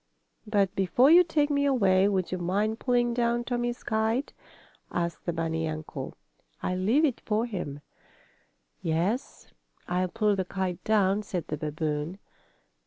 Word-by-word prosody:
"But 200 -3 +2
before 240 - +4
you 350 +2 +9
take 300 -3 +1
me 280 0 +2
away 195 -8 +4
would 190 -3 0
you 185 - -2
mind 205 +6 0
pulling 240 -1 +1
down 240 0 +1
Tommie's 240 0 -2
kite?" 220 +5 0 0.6
asked 170 0 -3
the - - +2
bunny 165 -1 -1
uncle. 155 0 -6 0.5
"I'll 185 0 -1
leave 235 +12 +3
it 270 -6 -1
for 220 +2 0
him." 175 - -5 1.0
"Yes, 175 - -2 0.4
I'll 180 +1 0
pull 210 +2 +1
the 190 - 0
kite 185 -1 -3
down," 205 -2 +2
said 180 -5 -5
the 150 - -1
babboon. 150 +2 -3
200 Hz, 145 wpm, -28 LUFS, 175-240 Hz, 1.0 s, you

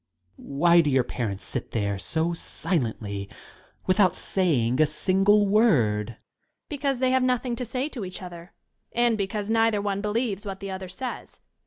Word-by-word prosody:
Why 170 +5 +3
do 150 - 0
your 130 -2 +3
parents 110 -5 -4
sit 125 - -5
there 100 -3 -1
so 160 - -1
silently, 110 - -3 0.6
without 185 0 +3
saying 135 -9 +1
a 155 - +5
single 195 +6 +3
word? 135 - +3
Young 115 - -11 0.6
LADY.VBecause 275 -3 0
they 255 0 +2
have 260 0 +3
nothing 250 -1 0
to 250 - -3
say 255 +4 -2
to 245 -8 -6
each 185 0 -7
other, 175 0 -10 0.4
and 240 -1 +3
because 205 +1 -2
neither 225 -2 +3
one 200 -1 -2
believes 210 -1 -1
what 195 -2 -6
the 195 -1 -6
other 190 -1 -6
says. 250 +7 -6
190 Hz, 165 wpm, -26 LUFS, 140-220 Hz, 0.6 s, a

